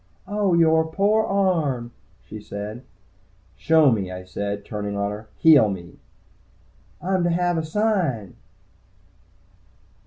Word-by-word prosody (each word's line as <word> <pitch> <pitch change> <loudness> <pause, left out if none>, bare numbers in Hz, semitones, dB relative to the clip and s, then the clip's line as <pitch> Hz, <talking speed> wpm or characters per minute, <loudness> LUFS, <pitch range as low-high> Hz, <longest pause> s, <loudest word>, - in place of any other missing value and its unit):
"Oh, 200 -3 +1
yore 160 -1 +3
pore 210 +5 +2
arm," 160 -12 0 0.3
she 110 0 -9
said. 105 +3 -7 0.7
"Show 160 -4 +4
me," 100 -5 -1
I 90 0 -7
said, 100 +2 -5
turning 105 -1 -4
on 100 0 -1
her. 105 +2 -8
"Heal 150 -9 +6
me!" 90 -3 -8 1.0
"I'm 185 0 0
to 175 - +1
have 175 +1 +1
a - - -3
sign!" 160 - -1
145 Hz, 120 wpm, -23 LUFS, -, 1.0 s, Heal